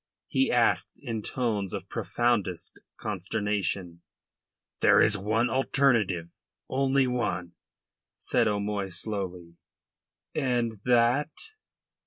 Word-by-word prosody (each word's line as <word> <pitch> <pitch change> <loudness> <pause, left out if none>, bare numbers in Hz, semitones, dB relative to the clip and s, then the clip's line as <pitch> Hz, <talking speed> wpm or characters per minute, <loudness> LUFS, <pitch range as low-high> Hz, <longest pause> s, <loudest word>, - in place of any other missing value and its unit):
he 135 0 +1
asked 120 -1 +2
in 115 -5 -3
tones 105 -5 -2
of - - -6
profoundest 115 -8 -1 0.2
consternation. 95 -4 -2 0.8
"There - - +6
is 110 - +5
one 110 +4 +1
alternative 115 -9 +2 0.4
one 130 - -3 0.2
only," 115 -10 0 0.7
said 115 - +1
O'Moy 100 -1 -1
slowly. 90 -3 -4 0.8
"And 120 -6 0
that?" 125 +4 +3
110 Hz, 90 wpm, -28 LUFS, 95-120 Hz, 0.8 s, There